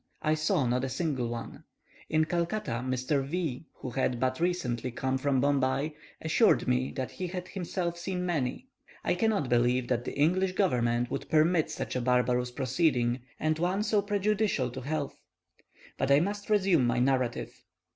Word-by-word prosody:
I 155 - +3
saw 155 -3 +1
not 125 +1 +1
a 135 - -1
single 135 -3 -1
one. 115 0 -6 0.5
In 155 0 +3
Calcutta, 170 - -1
Mr. 130 +2 0
V, 155 -1 -3
who 130 - -7
had 125 -1 0
but 130 0 0
recently 130 -9 -1
come 130 +2 -1
from 135 -1 +1
Bombay, 140 +2 +1 0.3
assured 160 - +3
me 125 +1 +1
that 130 -1 -4
he 185 - -4
had 180 0 -5
himself 175 -2 -3
seen 180 0 -3
many. 155 - -1 0.4
I - - +2
cannot 220 - +1
believe 120 +1 +2
that 120 -2 +1
the - - -5
English 185 +6 +2
government 120 - +1
would - - -4
permit 160 +1 +3
such - - -4
a 125 - 0
barbarous 125 0 +2
proceeding, 130 -1 +1 0.2
and 155 0 0
one 185 +4 +1
so 215 -1 +2
prejudicial 205 - 0
to 130 +1 -6
health. 145 +2 -3 0.8
But 135 - +1
I 140 +1 +6
must 205 +5 -2
resume 190 - +3
my 120 - +1
narrative. 125 -1 0
140 Hz, 165 wpm, -29 LUFS, 125-175 Hz, 0.8 s, I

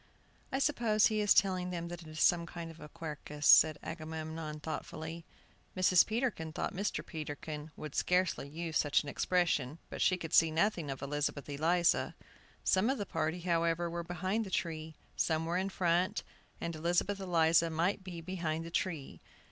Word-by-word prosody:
"I - - 0
suppose 235 -7 +3
he 215 -1 +2
is 205 - +1
telling 185 -2 +4
them 170 -1 -4
that 175 0 -7
it 165 - -12
is 155 0 -6
some 170 -1 +4
kind 170 -1 -7
of 165 - -15
a 150 - -10
'Quercus,'" 150 -1 -6
said 155 -1 +8
Agamemnon, 160 -1 -5
thoughtfully. 160 +1 -6 0.5
Mrs. 185 -1 +5
Peterkin 215 -9 -1
thought - - -2
Mr. 200 +3 -2
Peterkin 150 -1 -6
would 155 -2 -7
scarcely 180 -5 +1
use 160 +1 -2
such 145 0 +2
an 145 - -6
expression, 160 -5 +1
but - - -5
she 185 - +4
could 165 -3 -7
see 165 - +6
nothing 170 -1 0
of 135 0 -5
Elizabeth 145 0 -2
Eliza. 165 +4 +2 0.5
Some 190 +5 +3
of 270 - +1
the 205 - -3
party, 165 0 -2
however, 170 -1 +1
were 170 0 -3
behind 185 +6 -1
the 200 - -7
tree, 160 -3 -3 0.2
some 160 0 +1
were 170 +2 0
in 190 +1 -1
front, 185 +2 +1 0.4
and 170 -1 -3
Elizabeth 175 +5 0
Eliza 170 -3 +3
might 175 +5 0
be 175 -3 -7
behind 165 -2 -3
the 165 - -8
tree. 165 -6 -3
170 Hz, 175 wpm, -33 LUFS, 155-185 Hz, 0.5 s, said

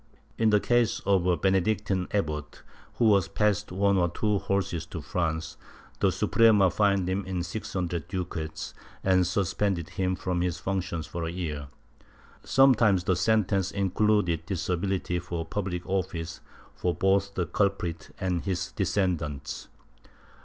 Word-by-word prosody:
In 110 -1 +3
the 105 -1 +5
case 120 0 +2
of 95 -3 +3
a 90 -1 +3
Benedictine 95 0 +1
abbot, 75 -7 -3 0.3
who 110 -3 +4
had 100 -3 +1
passed 105 -1 +1
one 100 +1 +2
or 85 -1 +2
two 105 +3 0
horses 95 -4 -1
to 85 - -6
France, 80 +1 -2 0.4
the - - +3
Suprema 105 -5 +4
fined 100 -1 +2
him 95 +2 -1
in 90 -2 -2
six 95 +5 -6
hundred 85 -4 -2
ducats 85 -4 -4 0.3
and 95 -2 +3
suspended 95 -2 0
him 95 -1 -1
from 90 -1 -2
his 90 -1 -1
functions 90 -3 -3
for 85 -1 -4
a 80 - -3
year. 75 -5 -4 0.8
Sometimes 115 -8 +4
the 95 - +2
sentence 100 -3 +2
included 100 -3 +1
disability 90 0 -1
for 85 -1 -4
public 90 -1 -3
office 90 -3 -2 0.3
for 90 -1 -1
both 100 +1 +1
the 90 - 0
culprit 90 -6 -1
and 90 -3 0
his 90 -2 -2
descendants. 85 -8 -2
95 Hz, 140 wpm, -27 LUFS, 85-100 Hz, 0.8 s, the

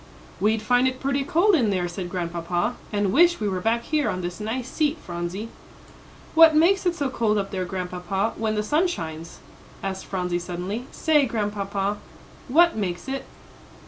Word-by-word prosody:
"We'd 215 +1 +1
find 245 +3 +3
it 260 0 -2
pretty 275 0 0
cold 350 +9 +3
in 250 - +3
there," 185 -3 0
said 175 +1 -5
Grandpapa, 175 -1 -2 0.2
"and 205 -2 0
wish 345 +4 +5
we 210 - -1
were 185 -2 -2
back 230 +3 +1
here 300 +2 0
on 185 - -2
this 175 +2 -5
nice 230 +4 -3
seat, 305 +2 0
Phronsie." 175 - -5 0.8
"What 320 -1 +8
makes 360 +4 +4
it 350 - +1
so 285 -4 -1
cold 220 -4 +1
up 195 -1 -2
there, 185 -1 -2
Grandpapa, 185 +3 -2
when 220 -1 -1
the 210 - 0
sun 305 - +2
shines?" 165 - -6 0.4
asked 190 -1 -4
Phronsie, 180 -2 -1
suddenly. 180 +7 -5
"Say, 300 -4 +2
Grandpapa, 205 -2 -2 0.5
what 340 +6 +5
makes 180 -3 -3
it?" 270 0 -3
210 Hz, 175 wpm, -24 LUFS, 185-270 Hz, 0.8 s, What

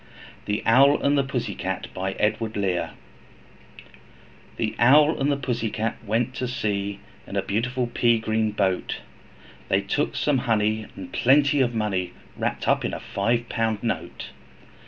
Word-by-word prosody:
Y - - -25
Z - - -24 0.4
The 105 +1 -2
Owl 135 +5 +5
and 140 +1 +3
the 140 - +3
Pussy 125 -6 -3
Cat 95 +1 -3
THE 100 0 -1 1.9
Owl 145 +6 +5
and 140 +2 +2
the 140 - +1
Pussy 125 -4 -2
Cat 110 +2 -2
went 115 +3 0
to 130 -1 -3
sea 100 -4 -2 0.3
In - - -7
a - - +1
beautiful 125 +5 -1
pea 120 -1 +2
green 110 0 0
boat, 95 -3 -1 0.7
They 95 - +3
took 100 +9 -1
some 145 -3 +1
honey, 110 -2 0
and 95 -2 -9
plenty 145 +2 +4
of 120 -2 +1
money, 95 -5 -1 0.2
Wrapped - - -2
up - - +3
in - - -2
a - - -5
five 115 +4 -1
pound 110 -2 -1
note. 115 - -3
115 Hz, 155 wpm, -24 LUFS, 105-125 Hz, 1.9 s, Owl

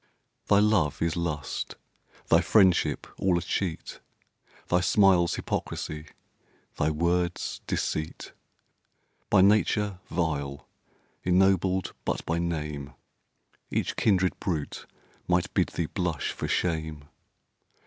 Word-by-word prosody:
Thy 100 - +5
love 105 -8 +3
is 85 0 0
lust, 75 -5 -3 0.5
thy - - +5
friendship 90 -8 +3
all 95 -2 +2
a - - -1
cheat, 90 -5 -3 0.7
Thy 90 - +3
smiles 90 -2 +4
hypocrisy, 75 0 -4 0.7
thy 75 - +2
words 85 +3 -1
deceit! 80 0 -3 1.0
By 100 - +5
nature 105 -1 +3
vile, 70 -5 -2 0.6
ennobled 95 0 +2
but - - -2
by 85 +1 0
name, 75 -5 -3 0.7
Each - - -1
kindred 95 -3 +2
brute 80 -6 -3 0.4
might 90 -1 +1
bid - - +2
thee 85 - -2
blush 85 -3 -2
for - - -4
shame. 80 -4 -1
85 Hz, 105 wpm, -27 LUFS, 80-95 Hz, 1.0 s, Thy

